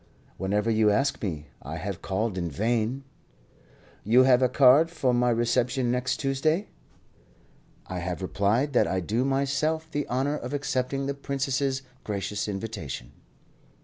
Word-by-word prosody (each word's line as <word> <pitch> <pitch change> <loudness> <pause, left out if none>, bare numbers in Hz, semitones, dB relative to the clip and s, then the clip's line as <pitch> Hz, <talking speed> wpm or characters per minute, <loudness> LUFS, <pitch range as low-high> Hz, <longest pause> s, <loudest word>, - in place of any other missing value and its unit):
"Whenever 105 +4 0
you 110 -1 +4
ask 135 +7 +1
me. 80 -7 -3 0.2
I 75 +4 -6
have 95 +2 -5
called 100 +1 -1
in 85 -2 -2
vain." 115 - -1 1.0
"You 120 +5 +5
have 130 -1 +5
a 130 - +4
card 135 +5 +6
for 140 -7 0
my 125 0 +3
reception 120 +2 +1
next 125 +1 0
Tuesday?" 155 +8 0 1.2
"I 90 - -5
have 90 +1 -4
replied 110 +10 +1
that - - +4
I 95 - 0
do 110 +8 -1
myself 140 +4 0
the 145 -1 -2
honour 135 +4 0
of 125 +2 -5
accepting 135 -1 -1
the 140 - -1
Princess's 135 -1 -1 0.2
gracious 105 0 -3
invitation." 95 - -5
125 Hz, 145 wpm, -27 LUFS, 105-135 Hz, 1.2 s, card